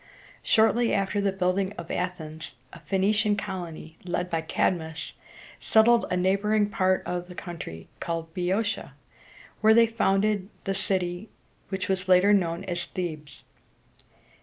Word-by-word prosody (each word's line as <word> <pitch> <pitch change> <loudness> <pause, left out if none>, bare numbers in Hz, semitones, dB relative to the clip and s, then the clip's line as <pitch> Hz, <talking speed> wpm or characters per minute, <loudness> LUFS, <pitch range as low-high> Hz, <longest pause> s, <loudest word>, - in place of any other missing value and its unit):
Shortly 230 +2 +3
after 195 +1 0
the 200 -1 +1
building 190 +1 0
of 170 -3 -8
Athens, 160 -5 -4 0.2
a - - -10
Phoenician 205 +2 +1
colony, 175 -5 -6
led 180 0 -2
by 165 -1 0
Cad´mus, 160 0 -1 0.5
settled 230 +1 +4
a 180 - 0
neighboring 205 +3 +2
part 185 -1 +2
of 180 0 -3
the 180 - -11
country, 155 - -7
called 165 -1 -4
Boe 180 - -4
o´tia, 205 +5 -1 0.7
where 220 +1 +6
they 230 0 +7
founded 205 -2 +1
the 195 - -1
city 185 0 -2 0.4
which 190 -1 -3
was 190 -1 -1
later 185 +3 +6
known 175 -2 +1
as 175 -2 -3
Thebes. 155 -7 -6
185 Hz, 135 wpm, -26 LUFS, 175-205 Hz, 0.7 s, they